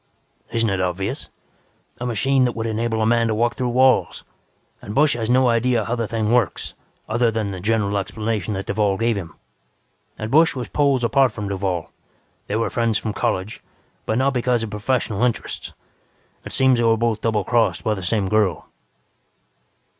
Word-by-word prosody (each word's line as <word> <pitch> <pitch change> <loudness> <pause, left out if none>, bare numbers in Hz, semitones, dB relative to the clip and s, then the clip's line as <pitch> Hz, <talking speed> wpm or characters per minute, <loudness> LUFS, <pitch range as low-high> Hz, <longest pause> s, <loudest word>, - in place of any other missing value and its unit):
"Isn't 115 -2 +1
it 95 -1 -1
obvious? 95 +2 -2 0.7
A 125 - -3
machine 130 +4 +2
that 120 - 0
would 115 0 -3
enable 110 0 -1
a - - +2
man 115 0 +3
to 110 - 0
walk 120 +2 +1
through 125 -1 -2
walls. 130 +2 +3 0.6
And 105 - -7
Busch 150 +1 +4
has 115 -1 -3
no 130 +1 +4
idea 115 -1 +2
how 120 - -1
the 115 -2 -2
thing 110 -1 -1
works, 120 -6 0 0.3
other 120 +2 +2
than 110 -2 -2
the 95 - -6
general 105 0 0
explanation 105 0 -3
that 95 0 -4
Duvall 100 -2 0
gave 115 +1 +1
him. 85 -5 -6 0.8
And 110 +1 -5
Busch 160 +2 +4
was 125 -3 -4
poles 140 -4 +2
apart 130 +1 +3
from 105 -3 -5
Duvall. 95 -4 -2 0.6
They 105 - -2
were 115 -2 0
friends 115 -2 +1
from 110 - -3
college, 95 +2 -2 0.5
but 110 - 0
not 135 +1 +2
because 125 -2 +1
of 110 - -5
professional 110 -1 -1
interests. 125 -2 -2 0.7
It - - -7
seems 130 -2 +3
they - - +2
were 115 -1 +3
both 115 -1 0
doublecrossed 115 +1 +1
by 110 - +1
the 100 - -5
same 95 +2 0
girl. 105 -4 0
115 Hz, 180 wpm, -21 LUFS, 105-120 Hz, 0.8 s, Busch